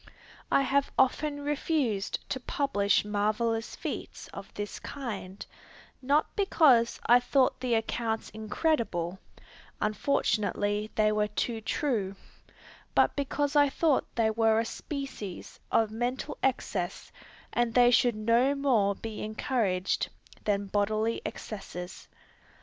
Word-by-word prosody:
I 275 - +4
have 280 +1 +1
often 285 +2 +2
refused 285 -8 -1
to 260 - -2
publish 245 -7 +1
marvellous 215 +2 0
feats - - -6
of - - -9
this 205 0 -5
kind, 205 -8 -6 0.6
not 285 +4 +1
because 300 - +4
I 240 +1 +7
thought 255 +1 +2
the 250 -2 +1
accounts 225 0 -2
incredible, 215 - -1 0.6
(unfortunately, 210 -2 0
they 215 -1 +3
were 210 0 +1
too 225 +1 -2
true,) 215 -6 -1 0.8
but - - +4
because 285 +1 -1
I 290 -1 +6
thought 300 0 +2
they 225 -2 +2
were 225 0 +3
a 230 - 0
species 270 - -6
of 220 -2 +3
mental 245 +6 -2
excess, 195 -8 -2 0.4
and 240 -1 +1
they 245 -1 +6
should 240 -1 +4
no 235 +6 +3
more 235 -8 +2
be 220 0 -6
encouraged 215 -4 0 0.4
than 200 -1 +1
bodily 215 +3 0
excesses. 180 -4 -7
230 Hz, 115 wpm, -29 LUFS, 210-270 Hz, 0.8 s, I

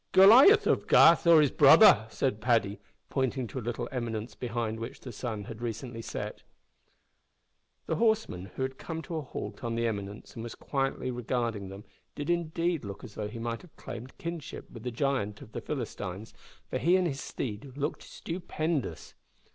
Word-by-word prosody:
"Goliath 255 - +8
of - - +1
Gath 170 +1 +6
or 165 -2 +8
his 145 - +3
brother!" 140 - +7
said 110 0 -1
Paddy, 115 -3 +1 0.3
pointing 130 -1 0
to 130 - -5
a - - -6
little 120 +1 -3
eminence 115 -3 -4
behind 115 -2 -3
which 115 - -6
the 130 - -8
sun 110 -2 -4
had 110 +2 -8
but - - -8
recently 115 0 -5
set. - - -6 1.4
The - - -1
horseman, 220 - +1
who 130 - -2
had 130 0 -4
come 165 -1 -5
to 165 -1 -5
a - - -2
halt 140 0 -7
on 115 -1 -2
the 115 0 0
eminence 100 -2 -4
and 115 - -7
was 120 0 -6
quietly 135 -2 -2
regarding 120 -4 -2
them, 100 +2 -9 0.3
did 145 +3 -2
indeed 170 -1 0
look 100 -1 -7
as 110 -5 -10
if 105 -1 -4
he 115 - -7
might 115 0 -3
have 175 - -18
claimed 125 +3 -9
kinship 170 -3 -6
with 115 - -10
the 125 - -3
giant 120 -5 -1
of - - -14
the - - -5
Philistines, 110 -7 -5 0.4
for - - -1
he 175 +3 +4
and 185 -1 +3
his 140 -5 -2
steed 125 +3 -6
looked 145 +2 -2
stupendous. 165 -4 -4
125 Hz, 185 wpm, -29 LUFS, 110-155 Hz, 1.4 s, Goliath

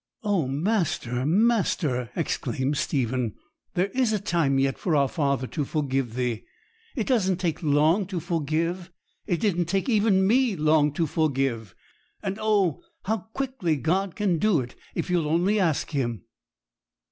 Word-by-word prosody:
'Oh, 200 - +1
master, 145 - -1
master,' 170 - +1
exclaimed 135 +3 -1
Stephen, 125 -5 -1 0.4
'there 185 +3 +1
is 255 -3 +2
a 215 - +2
time 170 -8 +1
yet 135 0 +1
for 170 -5 0
our 140 -1 +3
Father 140 -3 0
to 150 +3 -3
forgive 135 -5 -2
thee! 125 -3 -2 0.5
It 230 -6 -1
doesn't 190 -8 +2
take 170 -4 -1
long 155 +5 +3
to 185 -3 -3
forgive! 165 +2 -2 0.4
It 175 -5 0
didn't 175 -3 +1
take 190 - -1
even 205 -4 +3
me 240 +1 +3
long 155 -2 +3
to 165 +2 0
forgive; 135 - -1 0.5
and 195 +2 -3
oh, 205 -7 +2 0.2
how 220 +3 0 0.2
quickly 255 -12 -1
God 180 +7 0
can 190 -6 +1
do 210 -5 +3
it 120 0 -8 0.2
if 170 - -2
you'll 170 -4 +1
only 180 +6 +2
ask 165 -6 0
Him!' 120 - -2
165 Hz, 150 wpm, -25 LUFS, 140-195 Hz, 0.5 s, our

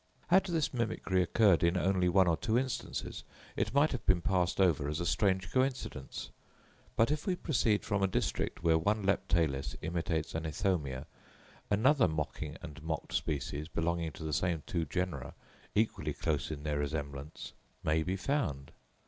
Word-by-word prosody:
Had 190 +2 +5
this 165 -6 0
mimicry 110 -6 0
occurred 95 0 +4
in 85 +2 +3
only 90 -1 +2
one 95 0 +5
or 85 - +4
two 110 +7 0
instances, 130 0 -3 0.3
it - - 0
might 145 +3 +4
have 130 - -3
been 95 -2 +5
passed 90 0 +1
over 80 -7 +3
as 75 - -2
a 85 - -2
strange 95 +1 +1
coincidence. 130 - -2 0.6
But, 115 +5 +3
if 150 +3 -2
we 185 - +2
proceed 120 -11 +1
from 100 -1 0
a 95 - +4
district 95 - -1
where 80 -1 +4
one 105 +5 +1
Leptalis 80 -9 +1
imitates 80 -1 -1
an 80 0 -2
Ithomia, 75 -5 -1 0.6
another 130 +7 +4
mocking 75 0 -3
and 80 -1 -8
mocked 80 -1 -4
species, 75 +1 -2
belonging 85 -1 -1
to 80 - -9
the 80 -1 -2
same 85 0 0
two 85 -2 -1
genera, 85 -5 -3 0.4
equally 110 +1 +1
close 75 -3 -1
in 75 -2 -5
their 75 -1 -1
resemblance, 70 0 -4 0.3
may 80 +1 +2
be 90 +4 -1
found. 95 - -1
85 Hz, 165 wpm, -32 LUFS, 75-105 Hz, 0.6 s, Had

